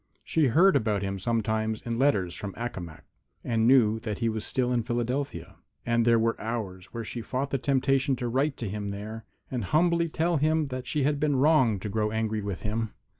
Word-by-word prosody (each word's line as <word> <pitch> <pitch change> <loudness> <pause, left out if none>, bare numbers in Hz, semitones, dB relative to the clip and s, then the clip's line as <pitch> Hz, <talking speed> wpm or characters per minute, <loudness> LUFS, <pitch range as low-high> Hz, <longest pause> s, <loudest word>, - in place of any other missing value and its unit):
She 160 -3 +2
heard 180 +11 +5
about 105 -3 +1
him 95 0 -3
sometimes 110 +1 0
in 115 0 -3
letters 100 -11 +2
from 100 -2 -6
Accomac, 95 -9 -6 0.4
and 115 -1 +1
knew 115 -4 +5
that 110 -2 -4
he 115 -2 0
was 110 -1 -3
still 125 -1 0
in 120 - +2
Philadelphia. 120 +5 -3 0.3
And 115 -1 +2
there 115 -1 +5
were 115 0 0
hours 105 -6 -4
when 115 -1 -5
she 115 +2 -5
fought 135 +4 -3
the 135 - 0
temptation 135 0 +2
to 125 -1 -3
write 135 +4 0
to 115 - -4
him 100 +1 -4
there, 105 +3 -6 0.3
and 125 -4 -2
humbly 170 - +2
tell 165 +2 +1
him 155 +2 +2
that 130 -1 -5
she 150 -3 0
had 145 +1 +1
been 150 -1 +1
wrong 130 -7 +4
to - - -4
grow 105 +1 0
angry 110 0 -1
with 100 -3 -5
him. 110 +1 -2
115 Hz, 205 wpm, -27 LUFS, 110-135 Hz, 0.4 s, heard